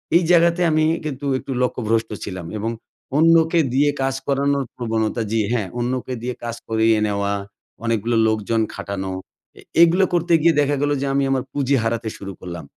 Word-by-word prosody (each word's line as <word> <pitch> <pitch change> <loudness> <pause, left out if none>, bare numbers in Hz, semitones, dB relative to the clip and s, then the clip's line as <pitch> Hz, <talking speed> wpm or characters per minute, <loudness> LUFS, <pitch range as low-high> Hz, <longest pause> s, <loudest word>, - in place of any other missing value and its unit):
এই 175 - +5
জায়গাতে 170 0 +4
আমি 155 0 +3 0.2
কিন্তু 145 -2 -4
একটু 135 - -8
লক্ষ্যভ্রষ্ট 115 -2 0 0.2
ছিলাম। 95 -3 -6
এবং 110 +2 -2 0.5
অন্যকে 165 +1 +4
দিয়ে 145 +3 +3
কাজ 135 0 0
করানোর 140 0 +1
প্রবণতা, 115 -1 -1
জি, 115 0 +2
হ্যাঁ, 105 -6 -1
অন্যকে 125 +1 -2
দিয়ে 125 0 -3
কাজ 115 -1 -3
করিয়ে 110 0 +3
নেওয়া, 100 0 -1 0.5
অনেকগুলা 115 0 0
লোকজন 110 +1 0
খাটানো, 95 -1 -4 0.5
এ - - -12 0.2
এগুলা 170 +3 +5
করতে 175 0 +1
গিয়ে 165 +1 +5
দেখা 145 0 +1
গেলো 145 0 +1
যে - - -1
আমি 140 0 +2
আমার 130 -2 +1
পুঁজি 140 -1 +1
হারাতে 115 0 -1
শুরু 100 -1 -7
করলাম। 85 -4 -7
125 Hz, 170 wpm, -21 LUFS, 110-145 Hz, 0.5 s, এই